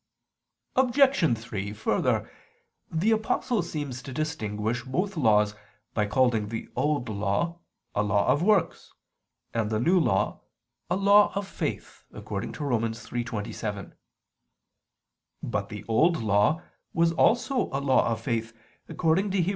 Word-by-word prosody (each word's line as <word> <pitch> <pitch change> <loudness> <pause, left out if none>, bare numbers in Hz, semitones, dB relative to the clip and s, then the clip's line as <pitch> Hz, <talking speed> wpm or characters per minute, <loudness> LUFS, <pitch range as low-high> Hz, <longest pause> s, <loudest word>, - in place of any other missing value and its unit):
Obj. 260 - +4
3: 105 -3 -5
Further, 105 - 0 0.6
the 170 +7 +1
Apostle 220 +1 +1
seems 140 -5 -5
to 130 - -9
distinguish 120 -6 -2
both 180 +10 -2
laws 105 -7 +3 0.4
by 105 -1 +1
calling 115 -1 +2
the 115 +1 -5
Old 145 -5 0
Law 110 +11 -1 0.3
"a 105 - +1
law 105 0 +1
of 140 +4 +3
works," 200 -1 +1 0.6
and 115 -2 0
the 110 -1 0
New 175 +10 +4
Law 95 - +1 0.5
"a 175 - +2
law 200 +2 +5
of 200 0 -2
faith" - - -5
(Rom. - - -8 0.2
3:27). 115 -4 -3 1.5
But - - -2
the 105 0 -8
Old 160 +10 +3
Law 105 - +2 0.3
was 165 0 +3
also 245 - +2
a 135 - -1
law 140 -1 +3
of 115 -1 -2
faith, 115 -1 -3 0.3
according 180 +5 +1
to 190 -2 +1
Heb. 175 - 0
130 Hz, 130 wpm, -27 LUFS, 110-175 Hz, 1.5 s, law